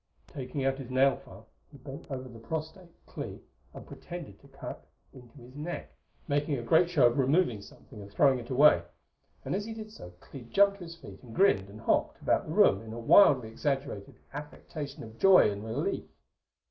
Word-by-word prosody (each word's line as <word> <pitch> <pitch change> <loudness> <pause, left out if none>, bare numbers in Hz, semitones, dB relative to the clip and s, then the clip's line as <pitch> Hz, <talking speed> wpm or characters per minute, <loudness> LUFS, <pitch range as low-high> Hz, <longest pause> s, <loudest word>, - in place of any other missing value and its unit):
Taking 135 0 -5
out 135 0 0
his 130 -2 -8
nailfile, 130 +1 0 0.3
he - - -13
bent 135 +1 -10
over 130 -2 -5
the 115 -2 -12
prostrate 160 - -6 0.2
Clee - - -8 0.3
and - - -11
pretended - - -9
to - - -19
cut - - -9 0.3
into 125 +2 -15
his 125 0 -14
neck, 155 +4 -6 0.3
making 145 -1 0
a 120 - -5
great 160 +8 +4
show 160 -8 +4
of 120 +3 +3
removing 135 - +2
something 105 +1 -14
and 100 0 -11
throwing 135 +3 +3
it 120 - -10
away; 135 - +6 0.6
and - - -2
as 200 +2 -2
he 225 0 -6
did 215 -1 -8
so 90 - -11
Clee 130 +3 -11
jumped 200 +10 +3
to 175 - -8
his 165 0 -9
feet - - -13
and 120 -3 -12
grinned 100 - +3
and 105 +2 -12
hopped - - 0
about - - 0
the - - -5
room 95 - +5
in 110 0 -9
a 120 - -6
wildly 130 - +5
exaggerated 135 -3 -3 0.2
affectation 150 0 -7
of 110 0 -12
joy 190 - +6
and 100 +1 -6
relief. 110 0 -3
135 Hz, 195 wpm, -29 LUFS, 115-155 Hz, 0.6 s, away